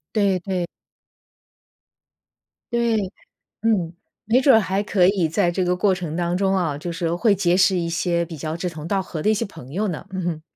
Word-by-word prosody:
对 200 -3 +2
对。 180 -1 -2 2.1
对， 235 -1 +2 0.7
嗯。 200 -7 +1 0.4
没 250 - +6
准 265 -2 +6
儿 - - +6
还 195 0 -1
可 190 -3 +3
以 190 -4 +2
在 175 +3 +1
这 180 +1 -1
个 180 0 +1
过 190 +1 +2
程 170 -4 -5
当 175 0 0
中 195 0 +2
啊， 165 -6 0
就 170 +4 -5
是 165 0 -1
会 205 +4 +3
结 180 -2 +2
识 190 0 +4
一 170 -2 -1
些 170 0 0
比 165 -1 -8
较 155 +2 -4
志 180 +1 -3
同 160 -2 -8
道 195 +1 +1
合 165 -4 -6
的 - - +3
一 - - +4
些 215 - -1
朋 130 -9 -10
友 205 +7 -1
呢， 175 -5 -5
嗯 190 0 -3
哼。 165 -3 -2
180 Hz, 220 characters per minute, -22 LUFS, 170-200 Hz, 2.1 s, 没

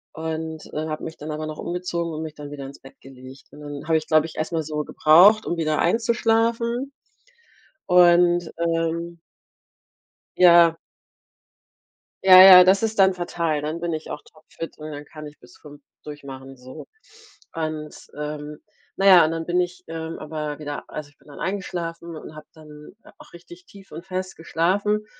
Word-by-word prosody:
und, 160 0 -6
äh, 155 +1 -3
habe 155 -1 -5
mich 160 - -7
dann 155 +1 -7
aber 155 +1 -5
noch 155 0 -7
umgezogen 170 -1 -4
und 155 - -5
mich 155 -1 -7
dann 145 -1 -10
wieder 140 -2 -8
ins 140 - -13
Bett 135 - -16
gelegt. 130 0 -14
Und 150 - -14
dann 145 +1 -8
habe 160 - +3
ich, 155 - -5
glaube 155 0 +3
ich, - - -13
erst 155 +2 -3
mal 160 - 0
so 150 0 -4
gebraucht, 185 +10 +5
um 175 - -2
wieder 155 -2 -1
einzuschlafen 230 +4 0 0.9
und, 175 -1 +4
ähm 170 0 -2 1.2
Ja. 170 -2 +6 1.5
Ja, 185 -1 +10
ja, 185 -1 +10
das 195 +3 +3
ist 220 -2 -2
dann 190 -1 +5
fatal. 170 -4 -3
Dann 155 +3 -5
bin 170 -1 -2
ich 155 -1 -6
auch 150 - -6
topfit 160 +1 -11
und 155 0 -8
dann 145 0 -8
kann 155 0 -11
ich 150 - -15
bis 125 0 -18
5 145 -1 -15 0.2
durchmachen 135 -2 -10
so. 130 +1 -12 0.7
Und 155 -2 -5 0.2
ähm 150 0 -6 0.4
na 195 - -1
ja 180 -4 +8
und 155 - -2
dann 165 0 -4
bin 175 +1 0
ich, 180 0 -3
ähm, 165 0 -6
aber 150 -1 -5
wieder 145 -1 -6
also 150 -1 -8
ich 145 - -30
bin - - -26
dann 145 - -13
eingeschlafen 170 -3 -5
und 155 0 -11
habe 155 - -11
dann 150 +2 -15 0.2
auch - - -17
richtig 345 - -15
tief 195 - -17
und 165 +3 -9
fest 185 0 -5
geschlafen. 200 +6 -1
160 Hz, 180 wpm, -22 LUFS, 150-180 Hz, 1.5 s, Ja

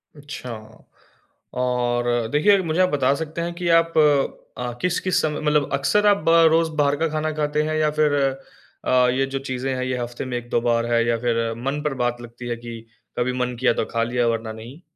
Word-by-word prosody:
अच्छा, 145 -4 -8 1.0
और 120 -2 0
देखिए 200 +7 +4
मुझे 165 +2 -1
आप 185 - +4
बता 140 -2 +2
सकते 160 +2 -5
हैं 170 0 -3
कि 175 -1 -4
आप 165 0 -3 0.6
अ, 125 -1 -4
किस-किस 180 0 +1
समय 150 -1 -2
मतलब 150 -2 +1
अक्सर 205 +10 +2
आप 205 -1 +5
बा 165 0 +6
रोज़ 165 -1 +2
बाहर 145 0 +3
का 165 +2 +1
खाना 155 0 -2
खाते 150 0 0
हैं? 155 0 -2
या 155 -1 +2
फिर 150 -1 +3 0.7
अ, 125 -1 +4
ये 135 +2 +1
जो 135 0 -4
चीजें 130 0 -3
हैं 130 - -2
ये 130 0 -2
हफ्ते 120 +2 -5
में 125 -1 -3
1-2 120 -1 -2
बार 115 -1 +1
है 115 0 +3
या 115 -1 +2
फिर 115 -1 0
मन 145 +2 -1
पर 150 -2 -1
बात 120 0 -1
लगती 120 +1 -9
है 120 - -1
कि 115 -1 -8 0.4
कभी 125 +1 0
मन 125 0 -3
किया 130 -2 +3
तो - - -1
खा 115 0 +1
लिया 120 0 0
वरना 115 -1 -2
नहीं? 120 +9 -11
130 Hz, 210 wpm, -22 LUFS, 120-155 Hz, 1.0 s, बा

